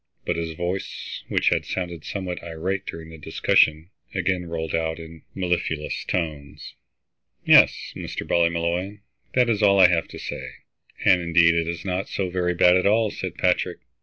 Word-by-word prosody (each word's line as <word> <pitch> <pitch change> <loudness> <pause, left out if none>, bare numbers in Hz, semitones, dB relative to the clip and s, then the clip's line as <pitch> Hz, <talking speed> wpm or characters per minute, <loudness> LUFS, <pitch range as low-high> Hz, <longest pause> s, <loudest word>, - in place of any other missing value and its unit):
But - - 0
his 80 -1 -3
voice, 90 +3 -5
which - - +2
had - - 0
sounded 85 -4 -4
somewhat 95 -3 -5
irate 90 +4 -4
during 80 0 -7
the 80 - -11
discussion, 80 +3 +2 0.2
again 90 -1 -1
rolled 80 -1 -4
out 80 -1 -1
in 80 -1 -11
mellifluous 85 -4 -2
tones. 75 -5 -4 0.7
"Yes, - - +5
Mr. - - -6
Ballymolloy, 85 +4 0 0.3
that 125 -1 +4
is 110 -2 0
all 100 -2 +5
I 90 -2 +8
have 85 -2 +1
to - - -10
say." - - -6 0.5
"And 90 -3 +5
indeed 85 0 +4
it's 85 +1 -2
not 95 +1 -2
so 95 -2 -2
very 90 -1 0
bad 90 +1 +5
at 90 - +1
all," 110 0 +3
said - - -5
Patrick. - - 0
85 Hz, 165 wpm, -24 LUFS, 80-95 Hz, 0.7 s, I